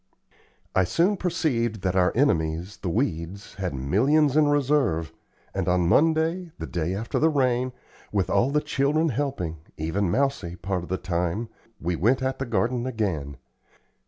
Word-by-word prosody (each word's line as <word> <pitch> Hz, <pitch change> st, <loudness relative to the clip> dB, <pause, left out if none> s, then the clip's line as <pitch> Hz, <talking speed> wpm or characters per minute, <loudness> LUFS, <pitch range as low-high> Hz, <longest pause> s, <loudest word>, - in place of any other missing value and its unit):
I 95 Hz, -, +4 dB
soon 170 Hz, -, +2 dB
perceived 125 Hz, -, -1 dB
that 95 Hz, -1 st, 0 dB
our 90 Hz, -1 st, +4 dB
enemies, 85 Hz, -, +1 dB
the 90 Hz, -, -4 dB
weeds, 95 Hz, -, -2 dB
had 90 Hz, -6 st, -2 dB
millions 130 Hz, -, +2 dB
in 155 Hz, -1 st, +5 dB
reserve, 135 Hz, -, +1 dB, 0.4 s
and -, -, -2 dB
on 90 Hz, -1 st, +2 dB
Monday 160 Hz, -, +2 dB
the 80 Hz, -, -5 dB
day 85 Hz, +2 st, -2 dB
after 110 Hz, +4 st, -2 dB
the 160 Hz, -, +4 dB
rain 130 Hz, -3 st, +1 dB, 0.4 s
with 100 Hz, -3 st, +1 dB
all 125 Hz, -, +2 dB
the 150 Hz, +1 st, +1 dB
children 150 Hz, +2 st, +1 dB
helping, 125 Hz, -, -2 dB, 0.2 s
even 85 Hz, +5 st, -1 dB
Mousie 130 Hz, -6 st, 0 dB
part 95 Hz, -1 st, -2 dB
of 85 Hz, -, -9 dB
the 95 Hz, -, 0 dB
time, 90 Hz, +5 st, -2 dB, 0.3 s
we 85 Hz, +1 st, -1 dB
went 120 Hz, +10 st, +2 dB
at 130 Hz, 0 st, -1 dB
the 135 Hz, -, -3 dB
garden 120 Hz, +3 st, 0 dB
again. 85 Hz, -, -2 dB
110 Hz, 160 wpm, -25 LUFS, 90-140 Hz, 0.4 s, in